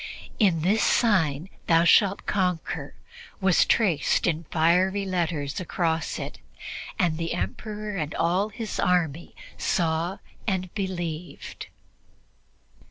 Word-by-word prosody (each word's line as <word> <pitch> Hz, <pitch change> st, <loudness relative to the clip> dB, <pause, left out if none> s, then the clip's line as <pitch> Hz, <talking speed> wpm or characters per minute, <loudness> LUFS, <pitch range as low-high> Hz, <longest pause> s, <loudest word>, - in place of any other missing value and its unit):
"In 185 Hz, -8 st, +3 dB
this 205 Hz, +5 st, +3 dB
sign 175 Hz, -, +2 dB, 0.2 s
thou 165 Hz, 0 st, +5 dB
shalt 195 Hz, +3 st, +4 dB
conquer" 180 Hz, -4 st, -1 dB, 0.4 s
was 190 Hz, -3 st, +4 dB
traced 180 Hz, -11 st, +2 dB
in 165 Hz, -1 st, 0 dB
fiery 180 Hz, +5 st, +2 dB
letters 165 Hz, -6 st, -1 dB
across 165 Hz, -3 st, -1 dB
it, -, -, -6 dB, 0.6 s
and 165 Hz, -3 st, +1 dB
the 165 Hz, 0 st, -2 dB
Emperor 210 Hz, -, -4 dB
and 155 Hz, -2 st, -3 dB
all 185 Hz, +5 st, +1 dB
his 220 Hz, 0 st, -5 dB
army 170 Hz, -3 st, 0 dB, 0.2 s
saw 165 Hz, +2 st, 0 dB, 0.3 s
and 185 Hz, -3 st, -1 dB
believed. 175 Hz, -4 st, -5 dB
175 Hz, 105 wpm, -26 LUFS, 160-195 Hz, 0.6 s, thou